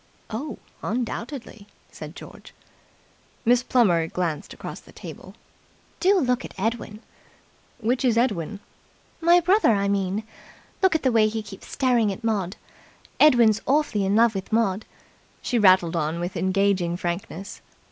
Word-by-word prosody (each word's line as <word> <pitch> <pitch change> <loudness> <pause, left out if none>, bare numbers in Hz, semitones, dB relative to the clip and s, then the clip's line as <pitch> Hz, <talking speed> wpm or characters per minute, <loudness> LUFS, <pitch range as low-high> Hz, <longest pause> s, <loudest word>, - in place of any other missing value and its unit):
"Oh, 270 +7 -5 0.2
undoubtedly," 230 -1 -5 0.2
said - - -9
George. - - -12 0.9
Miss 245 +1 +4
Plummer 185 -11 +2
glanced 165 -4 -3
across - - -8
the - - -18
table. - - -11 0.6
"Do 385 +2 +4
look 250 -6 +1
at - - -9
Edwin!" 215 +1 -3 0.8
"Which 240 +3 -1
is 240 -3 +2
Edwin?" 205 -5 0 0.6
"My 340 +1 +5
brother, 370 - +3
I 200 0 0
mean. 200 +1 -1 0.6
Look 380 -3 +4
at 320 - 0
the 260 - +3
way 220 -2 +4
he 220 0 -3
keeps 200 -2 -11
staring 240 -5 +1
at 195 - -8
Maud. 205 -4 -1 0.6
Edwin's 235 -7 +5
awfully 270 -7 +2
in 195 +1 +1
love 230 0 +4
with 195 +1 -6
Maud," 220 -2 +1 0.5
she 245 - -1
rattled 185 -4 +5
on 160 +1 -1
with 175 +2 -4
engaging 185 -1 +1
frankness. 175 +2 -5
215 Hz, 140 wpm, -24 LUFS, 190-245 Hz, 0.9 s, My